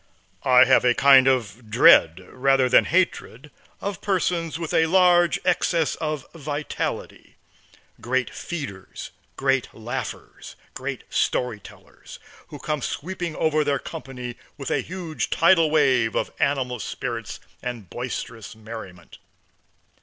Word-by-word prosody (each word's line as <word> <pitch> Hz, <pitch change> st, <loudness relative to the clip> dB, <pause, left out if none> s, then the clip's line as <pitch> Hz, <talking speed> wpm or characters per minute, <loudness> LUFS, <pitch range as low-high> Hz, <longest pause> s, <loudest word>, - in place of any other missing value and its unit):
I 125 Hz, 0 st, +6 dB
have 130 Hz, -, +4 dB
a 125 Hz, -1 st, +3 dB
kind 135 Hz, -1 st, +6 dB
of 115 Hz, -3 st, -1 dB
dread, 95 Hz, -6 st, +6 dB
rather 135 Hz, 0 st, +2 dB
than 125 Hz, -, +5 dB
hatred, 150 Hz, -6 st, -1 dB, 0.3 s
of 200 Hz, -2 st, -4 dB
persons 175 Hz, -4 st, -1 dB
with 165 Hz, -2 st, -5 dB
a 160 Hz, -, +3 dB
large 175 Hz, -1 st, +4 dB
excess 170 Hz, -2 st, +1 dB
of 155 Hz, -3 st, -3 dB
vitality; 150 Hz, -2 st, -5 dB, 0.7 s
great 130 Hz, +1 st, -1 dB
feeders, 110 Hz, -, -7 dB, 0.3 s
great 135 Hz, -2 st, 0 dB
laughers, 120 Hz, +4 st, -7 dB, 0.2 s
great -, -, -5 dB
story 125 Hz, -4 st, 0 dB
tellers, -, -, -14 dB, 0.3 s
who -, -, -9 dB
come 150 Hz, -2 st, -3 dB
sweeping 175 Hz, +3 st, -4 dB
over 155 Hz, -1 st, +1 dB
their 145 Hz, -1 st, 0 dB
company 125 Hz, -7 st, -8 dB, 0.2 s
with 140 Hz, -3 st, -5 dB
a -, -, +1 dB
huge 165 Hz, -8 st, -5 dB
tidal 165 Hz, -1 st, +4 dB
wave 130 Hz, -7 st, +2 dB
of -, -, -2 dB
animal 130 Hz, -3 st, 0 dB
spirits 115 Hz, -1 st, -5 dB, 0.2 s
and 120 Hz, -6 st, -6 dB
boisterous 115 Hz, -3 st, -6 dB
merriment. 110 Hz, -5 st, -11 dB
135 Hz, 125 wpm, -23 LUFS, 120-160 Hz, 0.7 s, I